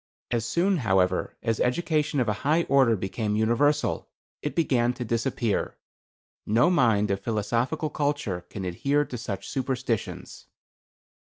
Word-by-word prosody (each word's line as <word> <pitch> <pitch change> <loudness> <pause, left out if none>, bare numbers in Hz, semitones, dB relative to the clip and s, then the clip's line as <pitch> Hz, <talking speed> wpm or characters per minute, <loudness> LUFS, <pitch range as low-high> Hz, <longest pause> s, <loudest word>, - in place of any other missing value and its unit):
As 115 -1 0
soon, 185 +7 +2
however, 95 - +1
as 115 -2 0
education 150 +2 +1
of 125 - +1
a 105 - +2
high 155 +5 +2
order 135 -6 +4
became 105 +2 -2
universal, 130 +7 +1 0.3
it 150 - -4
began 125 -7 +2
to 125 0 -5
disappear. 115 -1 -1 0.7
No 115 +11 +3
mind 110 - +3
of 100 - 0
philosophical 115 +9 -1
culture 145 -13 -1
can 95 -3 -6
adhere 140 +11 +1
to 125 - -7
such 100 -4 -5
superstitions. 130 -4 -3
120 Hz, 130 wpm, -26 LUFS, 105-145 Hz, 0.7 s, order